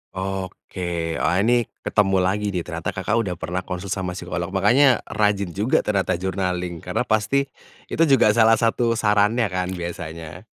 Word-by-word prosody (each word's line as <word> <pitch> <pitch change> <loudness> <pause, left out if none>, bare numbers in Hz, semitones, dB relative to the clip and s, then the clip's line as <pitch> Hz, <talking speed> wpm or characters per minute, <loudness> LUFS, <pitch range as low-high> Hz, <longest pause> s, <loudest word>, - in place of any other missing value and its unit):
Oke 90 -3 -4
wah 80 - +1
ini 120 +1 +2 0.2
ketemu 95 -2 +2
lagi 100 +3 0
nih 90 - -1
ternyata 85 0 -5
Kakak 105 +5 0
udah 95 -6 -2
pernah 90 +2 -3
konsul 90 +1 -5
sama 90 -2 -2
psikolog 85 -1 -4
makanya 120 +6 +4
rajin 100 -3 0
juga 105 +8 +1
ternyata 100 -4 0
journaling 90 -1 -3
karena 90 +8 -2
pasti, 115 +5 +1 0.5
itu 165 - +2
juga 135 -6 +5
salah 115 0 +5
satu 115 +1 +1
sarannya 105 +1 +2
kan 90 0 -1
biasanya. 85 0 -7
95 Hz, 155 wpm, -22 LUFS, 90-110 Hz, 0.5 s, juga